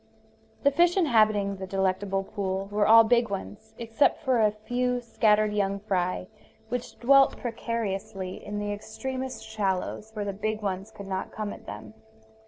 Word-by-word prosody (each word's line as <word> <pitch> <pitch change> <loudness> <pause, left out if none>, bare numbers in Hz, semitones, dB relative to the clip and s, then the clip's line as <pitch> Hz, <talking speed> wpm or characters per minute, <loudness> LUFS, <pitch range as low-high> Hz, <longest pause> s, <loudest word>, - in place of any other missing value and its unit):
The 280 - +5
fish 345 +5 +3
inhabiting 215 - +3
the 190 0 -6
delectable 195 0 0
pool 195 -1 -3
were 205 0 +2
all 225 +1 +9
big 235 0 +3
ones, 105 - -7
except 235 +7 +1
for 255 -5 +2
a 215 - +5
few 245 +4 -1
scattered 215 -3 +2
young 200 -1 0
fry 185 -3 -1 0.4
which 245 0 -4
dwelt 275 +2 +5
precariously 205 -6 -4
in 205 0 -5
the 205 0 -2
extremest 260 +5 -5
shallows 210 0 -2
where 210 -1 -3
the 200 - -2
big 215 +2 -3
ones 195 +1 -3
could 200 -2 -10
not 190 -1 -4
come 210 -1 -4
at - - -13
them. - - -8
210 Hz, 160 wpm, -27 LUFS, 195-235 Hz, 0.4 s, all